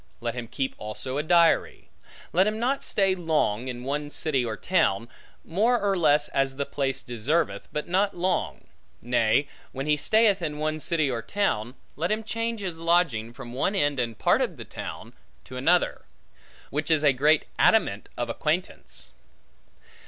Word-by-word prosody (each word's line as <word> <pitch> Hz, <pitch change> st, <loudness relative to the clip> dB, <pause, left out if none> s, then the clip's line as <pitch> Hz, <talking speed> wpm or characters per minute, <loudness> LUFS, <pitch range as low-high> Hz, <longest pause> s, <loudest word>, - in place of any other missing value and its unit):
Let 120 Hz, -1 st, -3 dB
him 120 Hz, -1 st, -6 dB
keep 135 Hz, +3 st, -3 dB
also 130 Hz, +6 st, -4 dB
a -, -, +2 dB
diary. 170 Hz, +1 st, +2 dB, 0.4 s
Let 185 Hz, +4 st, +4 dB
him 215 Hz, 0 st, -1 dB
not 255 Hz, +4 st, 0 dB
stay 195 Hz, -2 st, +2 dB
long, 155 Hz, -, 0 dB
in 125 Hz, -1 st, -5 dB
one 145 Hz, +2 st, -3 dB
city 145 Hz, -4 st, 0 dB
or 110 Hz, -3 st, -3 dB
town; 120 Hz, -, +1 dB, 0.4 s
more 225 Hz, +8 st, +2 dB
or 200 Hz, -1 st, +1 dB
less 150 Hz, -4 st, +3 dB
as 135 Hz, -1 st, 0 dB
the 140 Hz, +1 st, -2 dB
place 135 Hz, -2 st, -2 dB
deserveth, 140 Hz, +8 st, -1 dB
but 150 Hz, -, -3 dB
not 195 Hz, +2 st, +1 dB
long; 180 Hz, +1 st, -1 dB, 0.3 s
nay, 120 Hz, +3 st, +2 dB, 0.3 s
when 135 Hz, +1 st, -4 dB
he 150 Hz, 0 st, +3 dB
stayeth 210 Hz, +5 st, +3 dB
in 150 Hz, -3 st, -3 dB
one 155 Hz, +1 st, -2 dB
city 155 Hz, -3 st, +1 dB
or 115 Hz, -2 st, -2 dB
town, 125 Hz, -, -1 dB, 0.2 s
let 170 Hz, +5 st, -1 dB
him 215 Hz, +1 st, 0 dB
change 230 Hz, +1 st, -3 dB
his 175 Hz, -4 st, -4 dB
lodging 165 Hz, -10 st, +1 dB
from 120 Hz, 0 st, -10 dB
one 145 Hz, +10 st, 0 dB
end 145 Hz, -7 st, +1 dB
and 115 Hz, -3 st, -2 dB
part -, -, +3 dB
of -, -, -2 dB
the -, -, -8 dB
town, -, -, -8 dB, 0.3 s
to 130 Hz, -, -11 dB
another; 165 Hz, +8 st, +1 dB, 0.7 s
which 150 Hz, +3 st, -2 dB
is 155 Hz, -2 st, +3 dB
a 145 Hz, -2 st, +5 dB
great 150 Hz, +4 st, +3 dB
adamant -, -, +3 dB
of -, -, -2 dB
acquaintance. -, -, -3 dB
150 Hz, 170 wpm, -26 LUFS, 130-180 Hz, 0.7 s, a